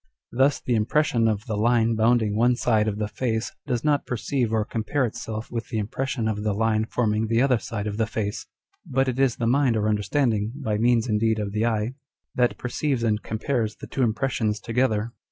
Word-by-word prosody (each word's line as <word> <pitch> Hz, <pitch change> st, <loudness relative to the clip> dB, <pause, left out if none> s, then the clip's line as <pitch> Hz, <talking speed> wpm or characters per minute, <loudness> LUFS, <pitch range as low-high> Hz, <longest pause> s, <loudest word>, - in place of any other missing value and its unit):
Thus 135 Hz, +3 st, +3 dB
the 125 Hz, -, -2 dB
impression 115 Hz, +1 st, +2 dB
of 110 Hz, -1 st, -1 dB
the 110 Hz, -, -3 dB
line 115 Hz, +1 st, +3 dB
bounding 110 Hz, -1 st, +2 dB
one 120 Hz, +3 st, +3 dB
side 110 Hz, -3 st, +2 dB
of 105 Hz, -1 st, -1 dB
the 105 Hz, -1 st, -1 dB
face 110 Hz, 0 st, -2 dB, 0.2 s
does 125 Hz, -3 st, -1 dB
not 150 Hz, -2 st, +1 dB
perceive 125 Hz, 0 st, -1 dB
or 110 Hz, -2 st, +1 dB
compare 115 Hz, +5 st, -1 dB
itself 110 Hz, -1 st, -5 dB
with 115 Hz, -1 st, -4 dB
the 115 Hz, -, -3 dB
impression 115 Hz, +3 st, -2 dB
of 105 Hz, -1 st, -1 dB
the 105 Hz, -1 st, 0 dB
line 110 Hz, 0 st, +1 dB
forming 110 Hz, -2 st, 0 dB
the 115 Hz, +1 st, +2 dB
other 130 Hz, -4 st, +3 dB
side 105 Hz, -3 st, -5 dB
of 105 Hz, -1 st, -3 dB
the 110 Hz, -1 st, +1 dB
face, 105 Hz, -2 st, -3 dB, 0.4 s
but 135 Hz, +1 st, 0 dB
it 130 Hz, 0 st, -2 dB
is 135 Hz, -3 st, +3 dB
the 120 Hz, -, -2 dB
mind 125 Hz, -1 st, +3 dB
or 105 Hz, 0 st, 0 dB
understanding 110 Hz, +1 st, 0 dB
(by 105 Hz, -1 st, 0 dB
means 120 Hz, 0 st, +3 dB
indeed 110 Hz, 0 st, +1 dB
of 105 Hz, -2 st, -3 dB
the 110 Hz, +3 st, 0 dB
eye) 110 Hz, +1 st, -1 dB, 0.4 s
that 125 Hz, -1 st, +1 dB
perceives 125 Hz, 0 st, -1 dB
and 110 Hz, -2 st, +1 dB
compares 110 Hz, 0 st, -2 dB
the -, -, -10 dB
two 135 Hz, -, -4 dB
impressions 110 Hz, -2 st, 0 dB
together. 115 Hz, -1 st, 0 dB
115 Hz, 205 wpm, -25 LUFS, 110-125 Hz, 0.4 s, Thus